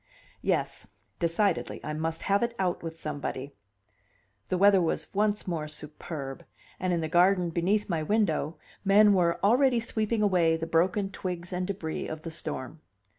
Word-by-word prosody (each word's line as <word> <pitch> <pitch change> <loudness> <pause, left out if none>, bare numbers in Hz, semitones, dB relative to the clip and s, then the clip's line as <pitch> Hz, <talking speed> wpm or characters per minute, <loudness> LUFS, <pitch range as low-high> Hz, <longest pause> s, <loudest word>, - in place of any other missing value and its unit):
Yes; - - -1 0.3
decidedly 175 +2 0
I 150 - -3
must 160 +1 -3
have 200 0 +2
it 235 0 -1
out 180 -2 0
with 165 -1 -6
somebody. 145 -2 -4 0.9
The 185 - 0
weather 195 0 +6
was 165 - -2
once 205 0 +1
more 160 -4 -2
superb; 150 -2 -7 0.4
and 185 0 0
in 170 -1 +1
the 160 - -1
garden 175 +1 +3
beneath 190 +6 +1
my 165 -4 -1
window 165 -4 0 0.3
men 205 +1 +6
were 170 -3 +2
already 245 +3 +4
sweeping 220 -1 -1
away 175 -5 +3
the 165 - -3
broken 180 +4 +1
twigs 180 -1 -5
and 180 0 -2
debris 175 -5 -4
of 155 0 -6
the 165 - -5
storm. 155 -2 -6
175 Hz, 160 wpm, -28 LUFS, 160-200 Hz, 0.9 s, weather